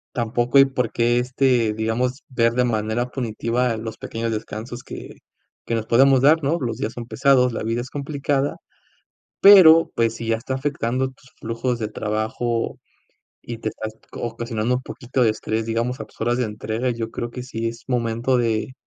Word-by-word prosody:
tampoco, 120 +2 +2
y 135 - +9
por 125 -4 -2
qué, 120 +1 +2
este, 125 -3 +2
digamos, 115 +5 -2
ver 115 -3 +2
de 125 0 +2
manera 110 +1 0
punitiva 120 -1 -1
los 110 0 -6
pequeños 115 0 -3
descansos 110 +3 -6
que - - -9 0.5
que 115 - -1
nos 110 -1 -3
podemos 135 +3 +5
dar, 155 +3 +5
¿no? 150 +5 +1
Los 120 -6 -3
días 110 - -3
son 120 -1 -7
pesados, 130 -1 +3
la - - -3
vida 115 +2 -1
es 130 - -10
complicada, 140 -1 -1 0.8
pero, 175 -5 +8
pues, 115 -1 +1
si 115 - -6
ya 115 - +2
está 120 +4 -6
afectando 130 -2 -1
tus 130 0 -19
flujos 115 +2 -2
de 110 - -3
trabajo, 110 +2 -2 0.6
y 120 -1 -7
te 110 - -2
estás 110 0 -6 0.2
ocasionando 115 0 -2
un 125 - -3
poquito 130 0 -3
de 115 - +4
estrés, 110 +1 -2
digamos, 115 +3 -1
a - - -6
tus - - -24
horas 120 +2 +1
de - - +2
entrega, 110 +3 -3
yo 115 -2 -3
creo 120 - -4
que 125 - -6
sí 115 -2 -3
es 115 +1 -11
momento 120 0 0
de 115 +1 0
120 Hz, 185 wpm, -22 LUFS, 115-130 Hz, 0.8 s, y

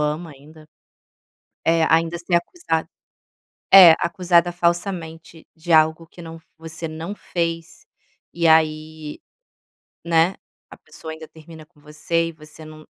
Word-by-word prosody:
ama 150 +2 -3
ainda. 155 +3 -18 1.0
Eh, 165 0 +2
ainda 165 +1 +1
ser 170 +1 -2
acusad 170 - -2 0.9
é, 185 -4 +10
acusada 175 0 +1
falsamente 170 -2 -4
de 165 +1 -7
algo 160 +1 +3
que 175 +1 -15
não 165 0 -10
f 160 - -22
você 160 0 -8
não 165 +6 -7
fez. 165 -3 -5 0.5
E 170 -1 -2
aí, 155 -1 0 0.9
né, 170 +2 +2 0.3
a - - -14
pessoa 160 - -11
ainda 160 0 -11
termina 160 0 -15
com 160 -2 -29
você. 165 +2 -2
E - - -8
você 155 0 -14
não 155 0 -13
165 Hz, 135 wpm, -21 LUFS, 155-170 Hz, 1.0 s, é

